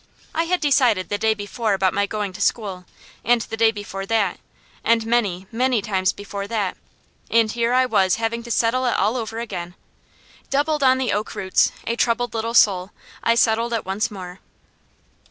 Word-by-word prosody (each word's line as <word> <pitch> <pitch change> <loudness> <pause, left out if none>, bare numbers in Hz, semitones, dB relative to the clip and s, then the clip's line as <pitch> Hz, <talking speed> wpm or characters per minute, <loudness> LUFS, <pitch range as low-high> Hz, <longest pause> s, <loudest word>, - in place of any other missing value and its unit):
I 330 +1 0
had 360 +1 0
decided 255 - +3
the 205 - -1
day 220 0 +2
before 205 +1 -1
about 190 -1 +1
my 200 0 +1
going 205 -3 -3
to 200 - -8
school, 195 -5 -1 0.4
and 240 +1 +3
the 220 - -5
day 225 0 +4
before 205 -2 -6
that, 210 -5 0 0.4
and 225 0 +2
many, 205 -6 0
many 250 +1 +1
times 195 -1 0
before 200 -1 -6
that, 205 -4 -1 0.5
and 225 -2 +3
here 235 +1 0
I 255 0 +4
was 195 -6 +2
having 230 +1 -2
to 235 - -11
settle 240 +2 +1
it 240 - +1
all 210 +5 +1
over 225 -2 -4
again. 185 -6 -5 0.7
Doubled 295 +2 +1
on 260 -1 +5
the 260 -1 -1
sak 210 +1 -2
roots, 190 -1 +2
a 235 - -1
troubled 240 0 0
little 230 +1 -2
soul, 190 -4 +4 0.3
I 230 - +2
settled 230 0 +2
it 225 - -2
once 195 +3 -1
more. 185 -3 -9
225 Hz, 185 wpm, -22 LUFS, 200-235 Hz, 0.7 s, on